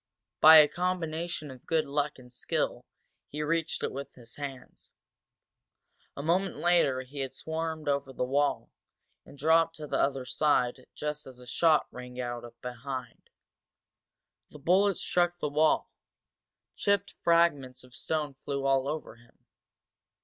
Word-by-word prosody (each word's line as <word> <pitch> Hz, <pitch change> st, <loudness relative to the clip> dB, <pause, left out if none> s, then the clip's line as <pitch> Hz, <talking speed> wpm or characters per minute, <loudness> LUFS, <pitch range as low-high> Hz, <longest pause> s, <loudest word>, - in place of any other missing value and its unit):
By 160 Hz, +1 st, +10 dB
a 150 Hz, -1 st, +9 dB
combination 170 Hz, -3 st, -3 dB
of 130 Hz, -2 st, -14 dB
good 160 Hz, -1 st, +2 dB
luck 145 Hz, +1 st, -1 dB
and 125 Hz, -1 st, -13 dB
skill 125 Hz, -, -2 dB, 0.4 s
he 150 Hz, +1 st, -4 dB
reached 165 Hz, +1 st, -1 dB
it -, -, -1 dB
with 140 Hz, +1 st, -7 dB
his 120 Hz, -2 st, -11 dB
hands. 135 Hz, -3 st, -8 dB, 1.3 s
A 140 Hz, -, -4 dB
moment 180 Hz, +4 st, +1 dB
later 170 Hz, -7 st, +2 dB
he 135 Hz, +3 st, -9 dB
had 135 Hz, -1 st, -3 dB
swarmed 160 Hz, -1 st, -4 dB
over 140 Hz, -1 st, 0 dB
the 125 Hz, -, -2 dB
wall 140 Hz, +3 st, 0 dB, 0.6 s
and 140 Hz, -, -14 dB
dropped 165 Hz, +3 st, +3 dB
to 155 Hz, -, -7 dB
the -, -, -1 dB
other 135 Hz, -2 st, 0 dB
side 130 Hz, -3 st, +1 dB
just 150 Hz, -1 st, -4 dB
as 130 Hz, -2 st, -11 dB
a 125 Hz, -, -13 dB
shot 155 Hz, +4 st, +3 dB
rang 125 Hz, 0 st, -9 dB
out 120 Hz, -1 st, -3 dB, 0.2 s
behind. 125 Hz, +1 st, -7 dB, 1.2 s
The -, -, -12 dB
bullet 185 Hz, +6 st, +3 dB
struck 175 Hz, -1 st, +1 dB
the 150 Hz, -, -2 dB
wall, 155 Hz, +2 st, +2 dB, 0.8 s
chipped 200 Hz, -1 st, 0 dB
fragments 145 Hz, -7 st, +2 dB
of 125 Hz, -1 st, -17 dB
stone 150 Hz, -1 st, -2 dB
flew 140 Hz, -1 st, -3 dB
all 135 Hz, 0 st, +2 dB
over 150 Hz, -5 st, -5 dB
him. 120 Hz, 0 st, -25 dB
145 Hz, 145 wpm, -29 LUFS, 130-160 Hz, 1.3 s, By